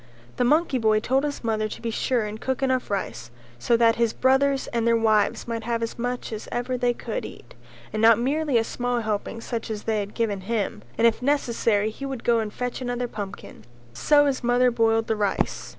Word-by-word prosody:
The - - +2
monkey 290 +1 +2
boy 215 -1 +3
told 265 +5 +1
his 290 -3 -3
mother 215 -1 0
to - - -7
be 230 - -3
sure 235 0 0
and 215 +2 -7
cook 265 0 -2
enough 260 -1 0
rice 120 - -3 0.3
so 235 - +2
that 230 -1 +4
his 230 -1 +1
brothers 270 +1 +2
and 235 -1 +1
their 230 0 +4
wives 215 -1 +2
might 230 -1 -3
have 230 -1 -1
as 230 - -5
much 245 -1 -3
as 215 - -7
ever 245 +1 -2
they 245 0 +1
could 235 -1 -4
eat, 120 - -11 0.4
and 215 - -1
not 225 -1 +7
merely 280 +2 +1
a 225 - +3
small 245 +1 -2
helping 220 +1 -3
such 230 -1 -4
as 215 -1 -4
they 220 -1 0
had 205 0 -5
given 210 -4 -1
him, 210 +1 -2 0.2
and 230 - +3
if 230 +1 +3
necessary 230 -6 +1
he 275 +5 -7
would 265 -3 -6
go 235 -1 +3
and 215 -1 -3
fetch 250 +3 -4
another 245 0 -2
pumpkin; 200 - -8 0.3
so 290 - +4
his 270 -2 -1
mother 245 +1 +3
boiled 225 -1 +2
the 225 -1 0
rice. 205 -2 -1
230 Hz, 215 wpm, -24 LUFS, 220-250 Hz, 0.4 s, not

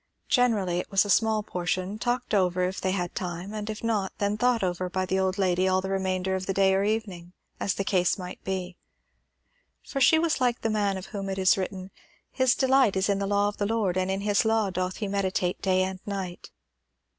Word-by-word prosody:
Generally 210 -9 +2
it - - -5
was 195 +1 +3
a 205 - 0
small 220 +1 +3
portion, 185 +2 -3
talked 245 0 -2
over 180 -2 +2
if 185 +1 -2
they 190 - 0
had 180 -2 -2
time, 180 +3 -5
and 210 0 -5
if 215 +1 -6
not, 210 -4 0
then 205 0 0
thought 240 0 +1
over 180 0 -1
by 185 0 -1
the 190 +1 0
old 190 0 0
lady 185 -1 +2
all 185 0 +3
the 190 +1 -4
remainder 190 -1 -1
of 190 0 -3
the 195 - -1
day 195 -1 +4
or 195 +1 +2
evening, 200 -5 -3 0.3
as 195 - -1
the 195 - -1
case 180 -2 +1
might 180 -1 -8
be. 185 -2 -4 1.1
For 275 - -4
she 320 - +6
was 320 -4 0
like 245 -1 +1
the 225 - 0
man 205 -2 0
of 185 - -7
whom 195 -1 -4
it 190 - -3
is 190 -1 +4
written 190 0 -5 0.4
"His 260 -1 +2
delight 265 -5 +3
is 190 +1 +1
in 200 -1 +1
the 200 - -1
law 205 0 +2
of 205 - -4
the 205 - 0
Lord, 215 -5 0
and 185 0 0
in 195 +1 -1
his 205 0 +2
law 220 -3 +1
doth 185 0 -2
he 210 - -3
meditate 190 -2 -1
day 185 -1 +2
and 190 0 -4
night." 190 -3 -5
195 Hz, 225 wpm, -27 LUFS, 185-210 Hz, 1.1 s, she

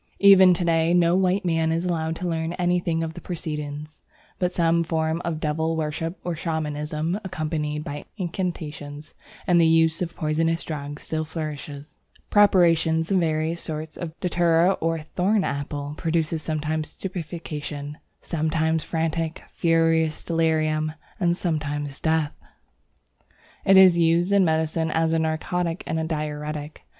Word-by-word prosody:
Even 190 -2 +8
to 175 - -1
day 165 0 +3
no 170 0 +4
white 190 +1 +2
man 165 -2 +1
is 165 +2 -1
allowed 165 -2 -1
to 180 +2 -4
learn 165 0 -2
anything 175 -2 0
of 160 0 -4
the - - -9
proceedings, 150 -3 -5 0.4
but 180 -1 +1
some 170 -1 +2
form 160 0 -1
of 165 -2 -2
devil 160 +1 -1
worship 160 +2 -3
or 175 -1 -2
Shamanism, 155 +1 -2
accompanied 155 -4 -3
by 145 0 -6
incantations 155 -5 -5 0.3
and 175 -1 +4
the 165 - +5
use 160 0 +3
of 170 -1 -3
poisonous 165 +2 0
drugs, 145 -1 -6
still 155 0 -2
flourishes. 150 -2 -7 0.3
Preparations 165 -4 +4
of 190 - +4
various 160 0 0
sorts 155 -1 -5
of 165 -2 -7
Datura 175 0 +3
or 165 0 +1
Thorn 190 +6 0
apple 145 +1 -3
produce 165 -1 -1
sometimes 155 0 -2
stupefaction, 155 -5 -6 0.2
sometimes 160 0 0
frantic, 165 0 -2
furious 165 -1 +2
delirium, 155 -2 +1 0.3
and 175 -2 +2
sometimes 145 -5 -2
death. 160 -2 +1 1.3
It 195 0 +6
is 185 -2 +7
used 170 +3 +3
in 200 -1 +5
medicine 160 0 +1
as 160 +1 +1
a 165 - +2
narcotic 165 +2 -1
and 160 0 -2
diuretic. 150 -1 -4
160 Hz, 140 wpm, -24 LUFS, 155-170 Hz, 1.3 s, Even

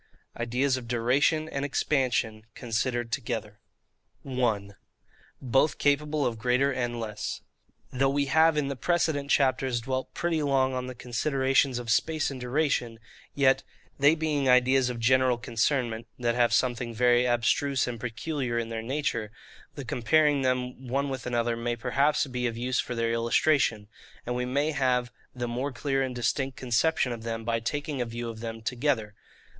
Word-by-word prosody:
IDEAS 125 +3 0
OF 125 -2 -8
DURATION 130 +7 +2
AND 140 -2 -3
EXPANSION, 125 -6 0
CONSIDERED 120 0 -2
TOGETHER. 110 -5 -4 0.6
1. 110 -7 -1 0.6
Both 135 +4 +2
capable 145 0 +1
of 115 -2 -2
greater 125 +4 +2
and 120 -2 -2
less. 110 -1 -4 0.5
Though 135 +1 +2
we 140 +1 +1
have 160 +3 +4
in 145 -2 +1
the 140 - -3
precedent 155 -2 0
chapters 130 -3 +2
dwelt 130 +2 -3
pretty 170 -2 0
long 135 -2 +2
on 125 0 -3
the 130 - -7
considerations 130 +1 +1
of 120 -2 -3
space 155 +6 +1
and 130 -2 -7
duration, 125 -3 0 0.4
yet, 135 -2 +4 0.4
they 145 +3 +5
being 150 -4 0
ideas 125 +1 +4
of 120 -1 -4
general 130 +1 +3
concernment, 120 -1 -1
that 120 -1 0
have 120 0 +2
something 120 -2 0
very 120 +1 +4
abstruse 125 +3 +1
and 120 -2 -5
peculiar 125 +1 -3
in 115 -1 -2
their 115 -1 -4
nature, 115 -4 -2 0.4
the - - -6
comparing 145 +4 +2
them 125 0 -2
one 140 +3 0
with 130 -2 -5
another 120 -1 0
may 120 +1 -2
perhaps 140 +6 +1
be 125 -2 -2
of 115 -1 -4
use 125 +1 -1
for 125 - -2
their 115 0 0
illustration; 115 -2 +2 0.4
and 125 - -2
we 125 0 -1
may 140 +5 0
have 125 -4 +1 0.2
the 120 -1 -3
more 125 +4 -2
clear 135 +1 -1
and 130 -2 -2
distinct 130 +3 -1
conception 125 +2 +1
of 115 -1 -5
them 115 0 -4
by 115 0 0
taking 145 +4 -3
a - - 0
view 120 +1 -5
of 110 -1 -8
them 115 -1 -6
together. 120 -4 -1
125 Hz, 165 wpm, -27 LUFS, 115-140 Hz, 0.6 s, they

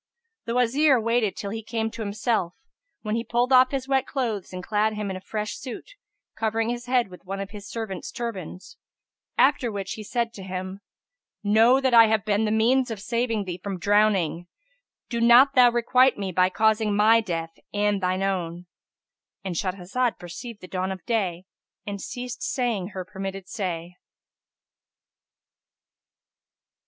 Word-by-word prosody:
The 230 - -2
Wazir 260 +3 +4
waited 230 -2 +1
till 200 - -4
he 225 +1 -4
came 225 0 -3
to 225 - -7
himself, 205 -3 -1 0.5
when 215 -1 -2
he 230 +1 0
pulled 240 +3 +1
off 255 0 +7
his 270 -2 -3
wet 270 -1 +1
clothes 230 -8 -3
and 180 -1 -6
clad 215 +2 +1
him 210 -2 -3
in - - -4
a 185 - -7
fresh 210 +1 -4
suit, 255 - -8 0.4
covering 225 +1 0
his 240 +1 -4
head 245 -4 +2
with 180 - -13
one 195 +1 -5
of 195 0 -5
his 205 0 -9
servants' 215 -6 -5
turbands; 200 -4 -6 0.6
after 265 -4 +3
which 200 -1 -5
he 215 - -7
said 235 +2 -2
to 200 - -9
him, 185 +1 -6 0.6
Know 225 +5 +5
that 260 -2 +1
I 230 -1 +8
have 220 -1 +1
been 210 +1 +1
the 210 - 0
means 245 +4 +3
of 225 -3 -5
saving 230 0 -1
thee 180 -2 -6
from 195 -2 -3
drowning: 195 -4 +2 0.6
do 235 -1 -2
not 240 +4 +7
thou 250 -2 +7
requite 250 +2 +3
me 195 -2 -3
by 185 +1 +3
causing 220 +1 +2
my 220 +2 +5
death 165 -4 -4
and 205 -1 +1
shine 185 +1 0
own."ÄAnd 180 +1 -6
Shahrazad 195 +7 -1
perceived 205 +6 -9
the 185 - -10
dawn 185 +1 -2
of 190 -1 -7
day 190 -6 -1 0.4
and 200 -1 -5
ceased 245 0 -6
saying 235 -8 -1
her 185 -2 -6
permitted 195 0 -6
say. 180 -5 -4
215 Hz, 165 wpm, -25 LUFS, 190-235 Hz, 0.6 s, I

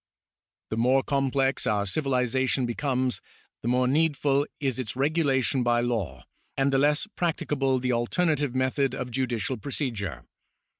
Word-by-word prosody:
The 110 - -2
more 130 +3 +3
complex 135 -1 0
our 105 -1 +1
civilisation 130 +2 +1
becomes, 130 +1 -1 0.4
the - - -5
more 125 +1 +2
needful 145 -1 +2
is 135 -3 -1
its 120 -4 -4
regulation 135 -3 +1
by 120 -1 +2
law, 100 - -2 0.3
and 135 0 +2
the 135 - +4
less 145 +4 +3
practicable 145 -6 0
the 125 0 0
alternative 145 +2 0
method 130 0 +1
of 125 -1 -5
judicial 125 -1 -1
procedure. 115 - -4
130 Hz, 135 wpm, -26 LUFS, 120-140 Hz, 0.4 s, the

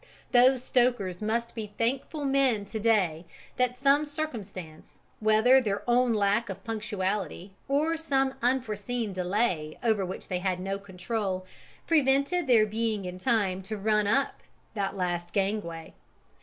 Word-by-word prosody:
Those 250 +1 +5
stokers 240 -9 +1
must 235 +2 -1
be 215 -3 -7
thankful 270 +5 -1
men 270 -6 +2
to 220 +2 -5
day 195 -8 +2 0.3
that 250 0 +1
some 280 +3 +4
circumstance, 225 - -7 0.2
whether 220 +5 +5
their 205 -2 -3
own 245 0 +3
lack 210 +2 +1
of - - -7
punctuality 205 -4 -3
or 300 +4 +1
some 270 -4 +1
unforeseen 235 -3 -1
delay 180 -4 -1
over 220 -4 +2
which 185 0 -6
they 180 -2 -2
had 185 -1 -1
no 195 +1 -3
control, 190 0 -3 0.4
prevented 295 +2 +2
their 230 -4 +6
being 215 -2 -2
in 180 0 -6
time 190 -2 +1
to 210 +3 -5
run 210 0 +1
up 270 +6 +1 0.3
that 195 -2 -2
last 175 -1 -2
gangway! 195 -5 -2
215 Hz, 140 wpm, -28 LUFS, 190-250 Hz, 0.4 s, their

